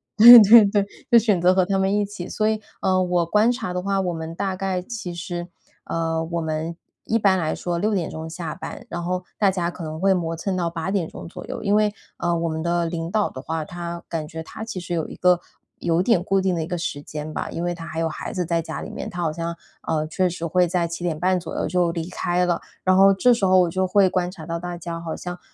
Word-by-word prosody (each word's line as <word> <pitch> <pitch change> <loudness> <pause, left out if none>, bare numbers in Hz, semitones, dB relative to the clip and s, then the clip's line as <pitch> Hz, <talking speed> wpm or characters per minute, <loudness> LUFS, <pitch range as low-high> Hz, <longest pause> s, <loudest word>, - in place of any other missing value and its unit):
对 235 +3 +12
对 220 +1 +9
对， 200 0 +1 0.3
就 235 - +8
选 210 -6 +3
择 180 +1 +5
和 185 -1 +3
他 195 0 0
们 190 +1 +1
一 205 0 +1
起。 200 -3 -7
所 215 - 0
以， 215 0 0 0.2
呃， 185 -1 +2
我 175 -1 +1
观 210 +7 +3
察 210 -7 -4
的 180 - -2
话， 195 0 0
我 180 -2 -1
们 160 0 -6
大 190 +1 -2
概 185 -1 -2
其 205 -3 -6
实， 175 0 -5 0.4
呃， 165 -1 -1
我 170 +1 -3
们 160 +1 -3 0.3
一 225 - +1
般 195 -3 +4
来 155 -2 -1
说 175 -1 -3
6 210 +5 0
点 180 -5 -1
钟 160 0 -6
下 165 -1 -5
班， - - -8
然 175 - -4
后 180 +1 -2 0.2
大 200 - +4
家 175 -2 -1
可 175 - -9
能 155 0 -5
会 195 +2 +4
磨 165 -3 -2
蹭 185 +3 -2
到 170 -2 0
8 165 +1 -4
点 190 -5 0
钟 - - -9
左 170 - -9
右。 - - -6
因 205 -1 +2
为， 210 -1 +2 0.2
呃， 175 0 0
我 165 0 -1
们 160 0 -3
的 170 0 +1
领 165 -1 -4
导 215 0 +1
的 130 - -8
话， 160 +2 -3
他 170 +1 -6
感 160 -2 -3
觉 160 +1 -7
他 220 - -8
其 215 -5 -5
实 175 0 -5
有 165 -2 -1
一 - - -9
个 180 -1 +3 0.4
有 170 0 +1
点 200 -4 +3
固 195 +1 +1
定 190 -1 +1
的 165 - -1
一 - - -6
个 175 - -3
时 165 -4 -4
间 150 +1 -6
吧， - - -3
因 170 - -4
为 175 0 -1
他 165 -1 -8
还 160 -1 -5
有 165 - 0
孩 155 - -6
子 180 - -1
在 165 0 0
家 165 - -6
里 - - -7
面， - - -6
他 175 -4 -5
好 160 -2 0
像， 170 +1 -4 0.3
呃， 155 -1 0
确 180 +3 +1
实 170 -1 -5
会 180 +2 +2
在 175 0 0
7:30 175 +2 -1
左 170 - -7
右 - - -1
就 180 -2 +1
离 165 0 -4
开 180 0 0
了， 175 -1 0 0.2
然 185 0 +4
后 195 +1 +7
这 245 +6 +4
时 225 -4 0
候 185 0 +5
我 175 - +2
就 185 +2 0
会 195 0 +4
观 180 -1 0
察 180 -4 -10
到 170 +1 -3
大 175 0 -5
家 170 0 -5
好 165 -1 -5
像， 180 0 -6
175 Hz, 280 characters per minute, -23 LUFS, 165-190 Hz, 0.4 s, 对